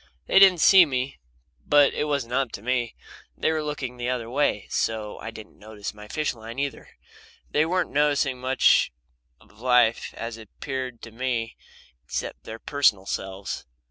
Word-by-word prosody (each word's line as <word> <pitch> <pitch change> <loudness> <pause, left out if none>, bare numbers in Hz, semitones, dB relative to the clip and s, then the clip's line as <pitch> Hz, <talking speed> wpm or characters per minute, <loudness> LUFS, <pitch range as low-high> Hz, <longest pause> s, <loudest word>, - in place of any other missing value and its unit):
They 190 - +5
didn't 190 -4 +7
see 190 +2 +9
me 135 -3 -2 0.4
but 145 -1 +5
it 150 - -1
wasn't 140 -5 -2
up 130 -2 +1
to 100 - -7
me. 120 -1 -1 0.4
They - - +1
were 160 -1 0
looking 140 -4 -4
the 120 0 -2
other 120 -2 -3
way, 125 -7 +1
so 110 -2 -2
they - - -5
didn't 110 -1 -12
notice 105 -1 -7
my 105 0 -12
fish 155 +6 -1
line 115 +1 -10
either. 140 0 -4 0.6
They 155 +2 +2
weren't 180 +1 0
noticing 145 -3 +1
much 130 +1 +4 0.5
of - - -22
life 125 -2 +3
as 115 0 -5
it 110 -3 -13
appeared 130 -3 -5
to 115 - -9
me 115 -1 -2 0.5
except - - -5
their 110 - -7
personal 115 -7 +2
selves. 95 -5 -5
125 Hz, 170 wpm, -25 LUFS, 115-145 Hz, 0.6 s, see